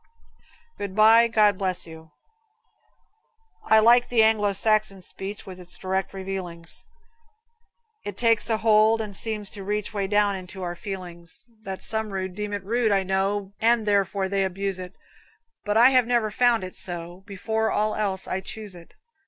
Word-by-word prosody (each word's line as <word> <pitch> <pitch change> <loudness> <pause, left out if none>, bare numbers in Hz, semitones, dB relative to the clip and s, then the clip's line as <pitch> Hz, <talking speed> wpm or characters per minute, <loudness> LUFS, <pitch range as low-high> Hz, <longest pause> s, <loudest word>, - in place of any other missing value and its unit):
"Good 200 -2 -5
Bye, 225 +2 +6
God 210 -4 +3
Bless 185 -2 -1
You." 160 -1 -12 1.6
I 220 - +5
like 240 +3 +5
the 230 -2 +4
Anglo 215 -2 +3
Saxon 215 -1 +2
speech 195 +3 -7
With 185 -1 -10
its 180 0 -4
direct 190 0 -2
revealings; 185 -3 -7 1.2
It 205 -2 -6
takes 230 -1 +2
a 220 - +2
hold, 220 0 +4
and 210 -3 -5
seems 210 -1 -4
to 200 - -8
reach 210 +2 -3
Way 200 -2 -1
down 205 0 +2
into 190 0 -8
our 175 -1 -4
feelings 175 -3 -8
That 190 -3 -7
Some 220 -1 -3
folks 190 -2 -4
deem 210 0 -4
it 205 -1 -4
rude, 225 +2 +1
I 195 -1 +2
know, 195 +1 -1
And 230 0 +3
therefore 200 -1 +1
they 195 0 0
abuse 190 0 -3
it; 180 +1 -8 0.7
But 210 +1 +1
I 245 +3 +7
have 255 -3 +4
never 235 -3 +1
found 240 -1 +2
it 185 - -7
so 175 0 -3
Before 220 +3 -2
all 215 +1 0
else 195 -3 -2
I 190 - -2
choose 210 +1 -8
it. 170 -1 -15
200 Hz, 170 wpm, -25 LUFS, 190-220 Hz, 1.6 s, I